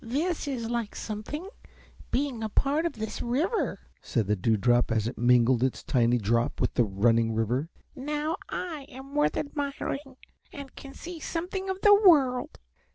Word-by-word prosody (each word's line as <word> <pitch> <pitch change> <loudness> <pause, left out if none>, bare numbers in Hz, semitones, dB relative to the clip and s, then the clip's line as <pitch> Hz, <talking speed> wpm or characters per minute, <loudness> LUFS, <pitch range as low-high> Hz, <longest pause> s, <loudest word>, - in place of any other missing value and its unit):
"This 300 +7 -1
is 245 -5 -3
like 235 -2 -3
something, 225 - -5 0.6
being 260 -3 -1
a 220 - -2
part 290 +9 +1
of - - -5
this 220 -1 -5
river," 275 - 0 0.2
said 115 -4 -1
the 105 +2 +1
Dewdrop 115 +4 +2
as 110 -1 +1
it 120 - -4
mingled 120 0 +4
its 130 - -1
tiny 120 -3 +2
drop 115 +2 0
with - - 0
the 120 - +3
running 115 +3 +2
river. 120 +8 0 0.3
"Now 300 +5 -2
I 315 -6 -5
am 265 +2 -11
worth 295 0 +2
admiring 280 -2 -4 0.3
and 280 -2 -9
can 275 -1 -10
see 345 -1 -8
something 370 +4 -4
of 380 0 -3
the 415 - +7
world." 295 - +4
250 Hz, 160 wpm, -28 LUFS, -, 0.6 s, the